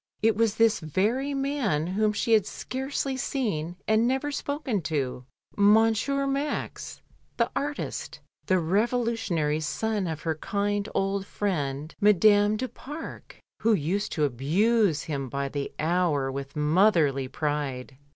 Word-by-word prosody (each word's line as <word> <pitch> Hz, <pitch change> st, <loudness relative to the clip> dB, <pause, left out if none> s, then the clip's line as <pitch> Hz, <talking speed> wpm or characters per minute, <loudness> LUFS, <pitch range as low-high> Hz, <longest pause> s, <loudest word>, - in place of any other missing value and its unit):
It 225 Hz, -1 st, +4 dB
was 225 Hz, -1 st, +2 dB
this 225 Hz, -1 st, +3 dB
very 220 Hz, -, 0 dB
man 270 Hz, -, 0 dB
whom 210 Hz, +4 st, +1 dB
she 225 Hz, +2 st, 0 dB
had 215 Hz, -3 st, +4 dB
scarcely 265 Hz, +1 st, -3 dB
seen 210 Hz, -, -2 dB
and 220 Hz, +2 st, +3 dB
never 265 Hz, +3 st, 0 dB
spoken 285 Hz, -, -2 dB
to, 135 Hz, -5 st, -2 dB, 0.3 s
Monsieur 225 Hz, +6 st, +3 dB
Max, 275 Hz, +2 st, -3 dB, 0.3 s
the -, -, +1 dB
artist, 290 Hz, +1 st, -4 dB, 0.3 s
the 185 Hz, -, +3 dB
revolu 225 Hz, +8 st, +1 dB
tionary 155 Hz, -8 st, -1 dB
son 210 Hz, +4 st, -1 dB
of 160 Hz, -1 st, -5 dB
her 160 Hz, -, 0 dB
kind 205 Hz, +5 st, -2 dB
old 195 Hz, 0 st, 0 dB
friend, 150 Hz, -6 st, -2 dB
Madame 205 Hz, +1 st, +5 dB
du 255 Hz, +3 st, -2 dB
Pare, 295 Hz, +5 st, -8 dB, 0.4 s
who 225 Hz, 0 st, +3 dB
used 195 Hz, +4 st, -1 dB
to 155 Hz, -, 0 dB
abuse 160 Hz, -, +2 dB
him 140 Hz, -4 st, -4 dB
by 140 Hz, +2 st, -2 dB
the 140 Hz, 0 st, -4 dB
hour 155 Hz, -5 st, +1 dB
with 140 Hz, +1 st, -6 dB
motherly 150 Hz, -3 st, +3 dB
pride. 140 Hz, -2 st, -3 dB
200 Hz, 135 wpm, -27 LUFS, 150-230 Hz, 0.4 s, Madame